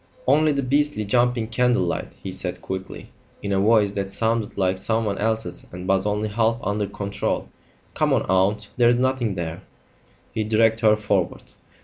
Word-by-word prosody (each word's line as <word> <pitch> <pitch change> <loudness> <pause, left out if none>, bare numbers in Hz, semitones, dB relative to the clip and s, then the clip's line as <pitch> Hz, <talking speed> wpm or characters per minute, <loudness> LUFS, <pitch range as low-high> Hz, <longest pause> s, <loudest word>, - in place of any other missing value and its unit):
"Only 155 0 +4
the 140 -1 -1
beastly 140 -4 +1
jumping 120 +1 +1
candle 125 -2 +2
light," 85 - -3
he 95 - -5
said 90 -1 -3
quickly, 95 0 -6 0.3
in 100 - -2
a 95 - +2
voice 105 0 +4
that 100 -1 -3
sounded 110 +1 -1
like 95 -1 +1
someone 110 0 -1
else's 110 +1 -2
and 90 +1 -7
was 95 +1 +2
only 105 +1 0
half 115 +2 +1
under 105 +1 -1
control. 100 0 -3 0.4
"Come - - +1
on, - - +2
aunt. 100 +2 +1
There's 120 -1 +5
nothing 125 -5 0
there." 85 -2 -4 0.7
He 110 - -1
dragged 110 +1 +3
her 110 -2 +5
forward. 100 -4 -2
105 Hz, 165 wpm, -23 LUFS, 100-115 Hz, 0.7 s, There's